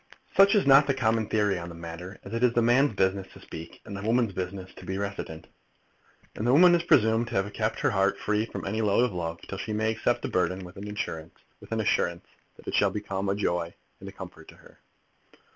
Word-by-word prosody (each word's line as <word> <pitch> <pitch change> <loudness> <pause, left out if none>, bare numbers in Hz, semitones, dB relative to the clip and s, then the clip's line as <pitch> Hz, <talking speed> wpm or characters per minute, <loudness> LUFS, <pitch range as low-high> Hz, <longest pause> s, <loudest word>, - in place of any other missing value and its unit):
Such 195 +2 +6
is 205 - +3
not 140 +1 +7
the 135 - +1
common 110 -3 +1
theory 105 -4 +1
on 85 0 -7
the 85 - -9
matter, 85 +3 -8
as 100 - -9
it 115 - -2
is 125 -2 +4
the 120 - +3
man's 120 +1 +3
business 95 0 +1
to - - -13
speak, 80 +1 -10
and 100 - -7
the 100 - -5
woman's 115 0 +1
business 95 0 -5
to - - -11
be 95 - -4
reticent. 100 -5 -5 0.9
And 110 - -3
the 125 - +4
woman 175 +4 +7
is 170 - +3
presumed 115 -8 +3
to 120 - -6
have 95 +1 0
kept - - -2
her - - +2
heart - - +2
free 105 +1 0
from - - -6
any 110 +3 -1
load 105 +2 +3
of 120 - -3
love, 85 -2 -4
till 95 - -6
she 110 - -4
may 110 +1 +1
accept 110 0 0
the - - -1
burthen 90 0 -1
with 90 - -12
an 105 +1 -6
assurance 80 -6 -5 1.2
that - - -18
it - - -3
shall - - +4
become 100 -2 -3
a 100 - +1
joy 85 -4 -1 0.2
and - - -8
a - - -10
comfort - - -11
to - - -14
her. - - -19
105 Hz, 230 wpm, -27 LUFS, 95-115 Hz, 1.2 s, not